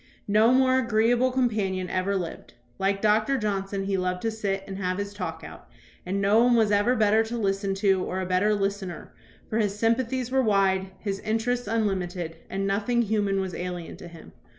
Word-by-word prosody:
No 215 Hz, +3 st, +4 dB
more 260 Hz, 0 st, +4 dB
agreeable 235 Hz, +1 st, +2 dB
companion 210 Hz, -8 st, 0 dB
ever 185 Hz, +2 st, -1 dB
lived. 175 Hz, -4 st, -5 dB, 0.2 s
Like 195 Hz, +1 st, 0 dB
Doctor 215 Hz, +5 st, +3 dB
Johnson, 195 Hz, -3 st, -2 dB
he 195 Hz, 0 st, -1 dB
loved 180 Hz, 0 st, -2 dB
to 225 Hz, -, 0 dB
sit 200 Hz, -3 st, -2 dB
and 195 Hz, 0 st, -7 dB
have 185 Hz, -1 st, -1 dB
his 200 Hz, 0 st, -4 dB
talk 165 Hz, -5 st, -5 dB
out, -, -, -12 dB, 0.4 s
and 195 Hz, +2 st, -1 dB
no 205 Hz, +4 st, +4 dB
one 245 Hz, 0 st, +4 dB
was 220 Hz, -2 st, +3 dB
ever 205 Hz, +5 st, +3 dB
better 220 Hz, -1 st, +3 dB
to 235 Hz, +2 st, -4 dB
listen 195 Hz, -2 st, -1 dB
to 195 Hz, -2 st, +2 dB
or 185 Hz, -, -3 dB
a 185 Hz, -, -2 dB
better 185 Hz, +4 st, +2 dB
listener, 195 Hz, -2 st, -4 dB, 0.3 s
for 225 Hz, -, -1 dB
his 205 Hz, -2 st, 0 dB
sympathies 235 Hz, +2 st, 0 dB
were 265 Hz, 0 st, +3 dB
wide, 195 Hz, -4 st, +2 dB
his 195 Hz, 0 st, -4 dB
interests 225 Hz, +2 st, -1 dB
unlimited, 185 Hz, -6 st, -2 dB
and 195 Hz, +1 st, -2 dB
nothing 215 Hz, +5 st, +1 dB
human 205 Hz, -2 st, 0 dB
was 190 Hz, -2 st, -3 dB
alien 175 Hz, -1 st, -5 dB
to -, -, -10 dB
him. 170 Hz, -2 st, -13 dB
200 Hz, 190 wpm, -26 LUFS, 190-225 Hz, 0.4 s, No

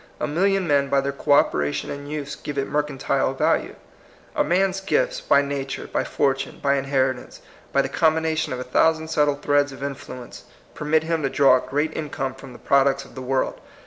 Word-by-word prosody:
A -, -, 0 dB
million 190 Hz, +4 st, +1 dB
men 140 Hz, -2 st, +2 dB
by 140 Hz, -, +3 dB
their 140 Hz, +1 st, -1 dB
co 140 Hz, +1 st, +1 dB
operation 75 Hz, -, +1 dB
and 145 Hz, 0 st, -7 dB
use 145 Hz, -2 st, -4 dB
give 145 Hz, -1 st, -7 dB
it 135 Hz, -, 0 dB
mercantile 140 Hz, -2 st, -1 dB
value. -, -, +1 dB, 0.6 s
A -, -, +3 dB
man's 190 Hz, +2 st, +1 dB
gifts, -, -, 0 dB
by 140 Hz, -, +4 dB
nature, 140 Hz, -1 st, -4 dB
by -, -, -1 dB
fortune, 135 Hz, -1 st, -1 dB
by 140 Hz, -1 st, +2 dB
inheritance, 135 Hz, -2 st, -1 dB, 0.3 s
by 140 Hz, -, +3 dB
the -, -, -2 dB
combination 160 Hz, +3 st, +1 dB
of 125 Hz, -, -3 dB
a -, -, -3 dB
thou 160 Hz, +6 st, +3 dB
sand 160 Hz, 0 st, -8 dB
subtle 150 Hz, -1 st, +2 dB
threads 145 Hz, 0 st, +1 dB
of 135 Hz, -, -9 dB
influence, 130 Hz, -3 st, -7 dB, 0.3 s
permit 155 Hz, +1 st, +1 dB
him 165 Hz, 0 st, -1 dB
to 135 Hz, -, 0 dB
draw 135 Hz, -1 st, +5 dB
a 125 Hz, -, -7 dB
great 150 Hz, +4 st, -1 dB
income 135 Hz, -4 st, -3 dB
from 135 Hz, 0 st, -12 dB
the 120 Hz, -, -11 dB
pro 140 Hz, -1 st, +3 dB
ducts 140 Hz, 0 st, 0 dB
of -, -, -16 dB
the 130 Hz, -, -7 dB
world. 130 Hz, +1 st, -1 dB
140 Hz, 205 wpm, -23 LUFS, 135-155 Hz, 0.6 s, draw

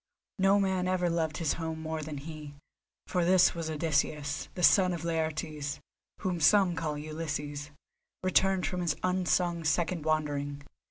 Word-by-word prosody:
No 195 Hz, +1 st, +4 dB
man 190 Hz, -2 st, +1 dB
ever 180 Hz, -2 st, +1 dB
loved 160 Hz, -2 st, -1 dB
his 160 Hz, -4 st, 0 dB
home 160 Hz, -1 st, -4 dB
more 160 Hz, 0 st, -4 dB
than 150 Hz, -1 st, -6 dB
he, 150 Hz, 0 st, -8 dB, 0.5 s
for 180 Hz, -2 st, 0 dB
this 180 Hz, +1 st, +5 dB
was 165 Hz, -2 st, -4 dB
Odysseus, 150 Hz, -1 st, -1 dB
the 180 Hz, -, -3 dB
son 185 Hz, -1 st, +6 dB
of 170 Hz, -2 st, -5 dB
Laertes—whom 160 Hz, +2 st, -4 dB
some 180 Hz, +3 st, +5 dB
call 150 Hz, -1 st, -2 dB
Ulysses—returned 155 Hz, +5 st, -2 dB
from 180 Hz, -1 st, -2 dB
his 170 Hz, -4 st, 0 dB
unsung 180 Hz, -2 st, +1 dB
second 165 Hz, +1 st, 0 dB
wandering. 145 Hz, -2 st, -1 dB
160 Hz, 140 wpm, -30 LUFS, 150-180 Hz, 0.5 s, son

